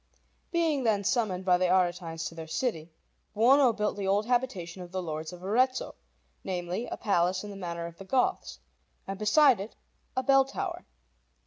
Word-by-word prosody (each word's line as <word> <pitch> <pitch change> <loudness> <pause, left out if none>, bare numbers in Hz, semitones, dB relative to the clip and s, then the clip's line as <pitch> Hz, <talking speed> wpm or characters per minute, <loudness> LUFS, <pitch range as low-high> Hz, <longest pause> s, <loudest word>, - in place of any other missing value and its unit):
Being 320 -5 +1
then 210 -3 +2
summoned 200 -3 0
by 180 -1 +4
the 185 - +2
Aretines 175 -3 0
to - - -8
their 165 -1 -8
city, 165 -3 -2 0.5
Buono 255 +4 +5
built 210 -2 -1
the 195 -1 -3
old 200 +2 +2
habitation 220 -8 -1
of 175 -1 -9
the 185 - -2
Lords 160 -2 -4
of 180 0 -11
Arezzo, 250 +7 +1 0.5
namely, 180 +4 -3
a - - -5
palace 185 -3 +1
in 205 - -7
the - - -8
manner 170 -3 -5
of 170 0 -10
the 195 - -9
Goths, 265 - 0 0.5
and 195 0 -6
beside 255 +2 +5
it 200 +3 -7 0.4
a 260 - +1
bell 270 +1 +5
tower. 270 - -5
195 Hz, 180 wpm, -29 LUFS, 175-245 Hz, 0.5 s, Buono